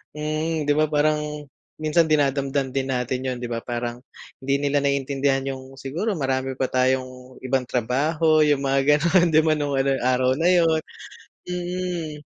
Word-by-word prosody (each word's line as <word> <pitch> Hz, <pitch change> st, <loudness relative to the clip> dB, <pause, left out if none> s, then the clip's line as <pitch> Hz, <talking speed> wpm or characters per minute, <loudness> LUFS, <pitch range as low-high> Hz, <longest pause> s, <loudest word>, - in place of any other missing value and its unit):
mm. 155 Hz, +1 st, -2 dB
'Di 145 Hz, -, +1 dB
ba 155 Hz, +1 st, +2 dB
parang 150 Hz, 0 st, +2 dB, 0.6 s
minsan 160 Hz, +1 st, +3 dB
dinadamdam 140 Hz, -2 st, +1 dB
din 135 Hz, 0 st, -2 dB
natin 130 Hz, 0 st, -2 dB
yun, 130 Hz, -, -2 dB
'di 120 Hz, -, -5 dB
ba 115 Hz, -, -2 dB
parang 120 Hz, 0 st, -4 dB, 0.4 s
hindi 135 Hz, +1 st, 0 dB
nila 145 Hz, 0 st, +2 dB
naiintindihan 140 Hz, -1 st, 0 dB
yung 130 Hz, 0 st, -10 dB
siguro 165 Hz, +11 st, -3 dB
marami 135 Hz, -3 st, -2 dB
pa 130 Hz, 0 st, -2 dB
tayong 130 Hz, 0 st, -1 dB
ibang 130 Hz, -1 st, -1 dB
trabaho, 150 Hz, +7 st, +1 dB
yung 145 Hz, -2 st, +3 dB
mga 135 Hz, 0 st, +2 dB, 0.2 s
gano'n, 175 Hz, +2 st, +3 dB
'di -, -, +8 dB
ba 160 Hz, -, +2 dB
nung 145 Hz, -1 st, -1 dB
ano 135 Hz, +1 st, +1 dB
yung -, -, -6 dB
araw 130 Hz, 0 st, +2 dB
na 165 Hz, -, +2 dB
yun, 165 Hz, -3 st, +4 dB, 0.7 s
mm. 175 Hz, -4 st, -4 dB
140 Hz, 165 wpm, -23 LUFS, 130-155 Hz, 0.7 s, di